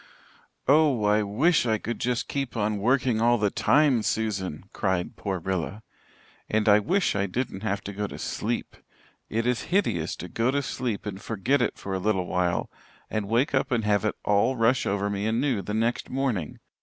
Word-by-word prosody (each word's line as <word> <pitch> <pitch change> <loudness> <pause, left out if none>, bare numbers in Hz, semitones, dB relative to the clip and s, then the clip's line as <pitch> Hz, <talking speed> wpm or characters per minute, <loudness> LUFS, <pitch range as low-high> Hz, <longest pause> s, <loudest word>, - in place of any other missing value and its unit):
"Oh, 140 -5 +4
I 105 +1 +3
wish 135 - +2
I 110 -1 +2
could 115 +3 -5
just 125 -1 -1
keep 135 -4 -3
on 105 -1 0
working 125 0 +2
all 120 +1 +4
the 105 -3 +1
time, 145 -6 +3
Susan," 100 -8 -2
cried 95 -3 -1
poor 95 -2 -3
Rilla. 95 +4 -3 0.7
"And 110 0 +1
I 105 0 +7
wish 180 - +1
I 100 0 +1
didn't 100 -1 -3
have 100 -2 -2
to 100 - -6
go 105 +1 -2
to - - -8
sleep. - - -3 0.5
It 115 +1 -1
is 125 -2 0
hideous 95 - +1
to 90 - -7
go 115 +7 0
to 140 +1 0
sleep 120 -5 -3
and 100 -1 -5
forget 115 +6 0
it - - 0
for 100 - -5
a 95 - -1
little 95 -2 0
while, 90 -1 -1 0.4
and 105 -2 -2
wake 120 +6 +2
up 130 - +1
and 120 -3 +1
have 105 -1 +2
it 110 - 0
all 105 +6 +3
rush 120 +2 +2
over 100 0 0
me 100 +1 -2
anew 120 0 +1
the 105 +3 -4
next 115 +2 0
morning. 125 - -2
110 Hz, 195 wpm, -26 LUFS, 100-125 Hz, 0.7 s, I